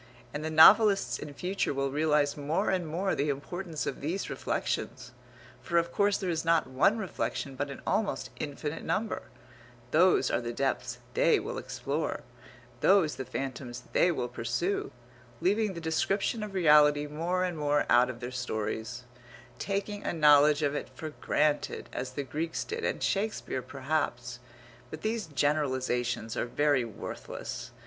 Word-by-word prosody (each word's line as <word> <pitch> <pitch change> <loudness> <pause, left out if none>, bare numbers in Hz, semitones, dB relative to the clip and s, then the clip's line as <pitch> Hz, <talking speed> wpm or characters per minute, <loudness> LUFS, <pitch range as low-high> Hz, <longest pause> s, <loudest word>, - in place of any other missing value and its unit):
And 150 +1 -4
the 160 - -2
novelists 195 - +6
in 145 - -7
future 180 -4 -1
will 135 0 -1
realize 150 -1 +2
more 155 +8 0
and 180 -3 -1
more 180 +5 -1
the 145 +1 0
importance 155 +2 -4
of - - -4
these 165 +7 -3
reflections, - - -3 0.5
for 170 - 0
of 170 0 +2
course 200 +1 +2
there 190 - -4
is 160 -1 -1
not 165 -1 +3
one 135 - +2
reflection 140 - -3
but 140 +2 -3
an 140 - -8
almost 215 -2 -1
infinite 150 +2 -4
number; 215 +3 -1 0.7
those - - +4
are - - +1
the - - -4
depths - - -1 0.2
they - - +4
will 475 +3 -4
explore, - - -3 0.6
those 185 -6 +4
the 130 - -4
phantoms 130 -1 -5
they 180 - +4
will 125 -7 -2
pursue, 120 - -2 0.5
leaving 205 +1 +1
the - - -4
description 195 +7 0
of 210 -2 -6
reality 150 -4 +5
more 170 +5 -1
and 180 -2 -1
more 145 -1 +1
out 125 +1 +5
of 125 -1 -7
their 120 +1 -5
stories, 120 0 -3 0.6
taking 200 +1 -3
a - - -1
knowledge 150 -1 +5
of 145 -1 +1
it 145 - -4
for 155 -1 -6
granted, 150 0 0
as 125 0 -4
the 140 - -3
Greeks 160 +4 -3
did 450 +2 -5
and - - -1
Shakespeare 205 -9 -1
perhaps 130 -3 -3 0.5
but 155 - -8
these 220 -3 -1
generalizations 130 -6 0
are - - -1
very 145 0 +2
worthless. 115 -3 -7
150 Hz, 155 wpm, -29 LUFS, 135-185 Hz, 0.7 s, novelists